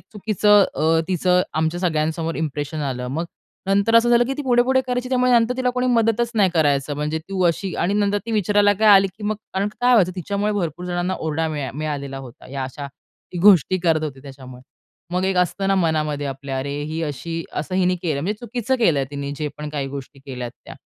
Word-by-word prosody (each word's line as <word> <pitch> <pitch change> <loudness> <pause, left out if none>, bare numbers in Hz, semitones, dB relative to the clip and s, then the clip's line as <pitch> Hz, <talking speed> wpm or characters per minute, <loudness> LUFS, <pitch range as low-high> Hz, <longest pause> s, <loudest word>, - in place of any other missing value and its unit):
चुकीचं 210 -1 +3
अ, 160 +1 +2
तिचं 180 0 +2
आमच्या 160 +3 -1
सगळ्यांसमोर 160 -1 -1
इंप्रेशन 150 0 -3
आलं. 125 0 -4
मग 160 +6 -2 0.4
नंतर 200 +3 +2
असं 240 +1 +4
झालं, 240 0 +5
की 270 - -2
ती 295 - -3
पुढे-पुढे 255 +1 +3
करायची 250 0 -2
त्यामुळे 250 -1 +2
नंतर 240 +1 +3
तिला 255 -1 +1
कोणी 250 0 -1
मदतच 235 -1 +2
नाही 200 -4 +3
करायचं. 145 -2 +1
म्हणजे 150 +2 -2
तू 190 -1 -1
अशी 175 +3 -1
आणि 200 +3 0
नंतर 205 0 +1
ती 230 - -3
विचारायला 205 0 +3
काय 220 -1 +4
आली, 195 0 +6
की 210 - -8
मग 215 0 -1 0.2
कारण 200 +2 0
काय 250 0 +4
व्हायचं 185 -6 +4
तिच्यामुळे 200 +3 -1
भरपूर 175 -3 -3
जणांना 175 +1 -1
ओरडा 160 +1 -1
मिळा 145 -4 -3
मिळालेला 140 -3 -4
होता. 125 -3 -12
या 135 -1 -3
अशा 140 +2 -7 0.5
ती 175 - -4
गोष्टी 185 -1 +5
करत 165 -3 +1
होती 135 -3 -6
त्याच्यामुळे. 130 -2 -11 0.5
मग 180 +1 0
एक 190 -1 0
असतं 195 +2 0
ना 195 - +3
मनामध्ये 155 -5 0
आपल्या 135 0 -5
अरे 140 +2 -3
ही 160 +2 -4
अशी, 165 +3 -4
असं 170 +5 -4
हिने 180 -1 +2
केलं 150 -5 -1
म्हणजे 205 +6 -2
चुकीचं 240 +2 -2
केलंय 155 - +2
तिने 140 0 -5
जे 150 -1 -2
पण 150 0 -5
काही 145 -2 -3
गोष्टी 135 0 -8
केल्यात 125 -3 -7
त्या. - - -10
175 Hz, 205 wpm, -21 LUFS, 150-210 Hz, 0.5 s, आली